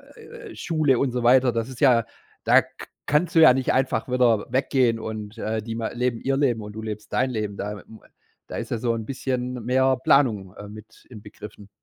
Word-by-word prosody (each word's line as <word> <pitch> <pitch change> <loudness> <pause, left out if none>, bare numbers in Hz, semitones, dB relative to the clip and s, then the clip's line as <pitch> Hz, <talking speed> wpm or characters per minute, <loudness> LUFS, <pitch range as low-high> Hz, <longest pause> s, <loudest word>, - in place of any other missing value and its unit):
äh, 470 -5 -12
Schule 155 -7 +1
und 135 -3 0
so 125 -1 -3
weiter. 125 +1 +5
Das 115 +1 -3
ist 130 -3 -10
ja 120 -5 +4 0.4
da - - +5
k - - -13 0.2
kannst 155 +4 +1
du 165 - +6
ja 155 -6 +8
nicht 130 0 0
einfach 130 -2 0
wieder 120 -4 +2
weggehen 130 -3 +1
und, 110 0 -7
äh, 110 0 -3
die 115 +1 -6
ma 115 -1 -3
leben 120 -1 -2
ihr 135 0 0
Leben, 120 -6 +1
und 105 0 -9
du 110 - -7
lebst 105 -1 -7
dein 130 +1 +1
Leben. 105 -3 -3
Da 105 - -4
m 110 +1 -15 0.5
da - - -8
ist - - -6
ja 120 - 0
so 115 +1 -1
'n 110 -2 -5
bisschen 125 -1 -3
mehr 130 +1 +2
Planung, 110 -8 +2
äh, 105 - -10
mit 105 +1 -14
inbegriffen. 105 -2 -12
120 Hz, 215 wpm, -23 LUFS, 110-130 Hz, 0.5 s, ja